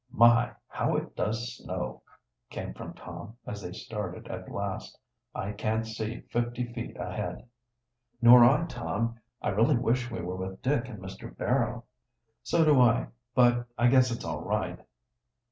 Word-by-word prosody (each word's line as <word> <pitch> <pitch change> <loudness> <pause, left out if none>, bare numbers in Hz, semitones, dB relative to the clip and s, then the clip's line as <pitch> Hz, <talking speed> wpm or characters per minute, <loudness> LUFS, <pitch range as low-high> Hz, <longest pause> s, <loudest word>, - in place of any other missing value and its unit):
"My! 120 0 +5 0.2
how - - 0
it - - -5
does 115 +2 -2
snow!" - - -5 0.5
came - - -5
from - - -8
Tom, 115 - -9
as 105 0 -5
they 90 - -6
started 105 -2 -6
at - - -6
last. - - -4 0.4
"I 100 - -2
can't 110 +2 -1
see 110 +1 -4
fifty 120 +1 -2
feet 115 -1 -6
ahead." - - -4 0.7
"Nor 120 0 +9
I, 145 +7 +5
Tom. 115 -4 -3 0.2
I - - +1
really 115 +8 +3
wish 125 +1 +1
we 115 - -4
were 90 +2 -4
with 95 0 -6
Dick 130 -2 +1
and 110 - -7
Mr. 95 0 -9
Barrow." 120 -2 0 0.6
"So 165 - +3
do 145 -4 +6
I, 120 -1 +4 0.3
but 120 -1 +4
I 120 +2 +5
guess 130 0 +5
it's 115 - -4
all 80 -3 -3
right." - - -2
120 Hz, 160 wpm, -29 LUFS, 110-125 Hz, 0.7 s, Nor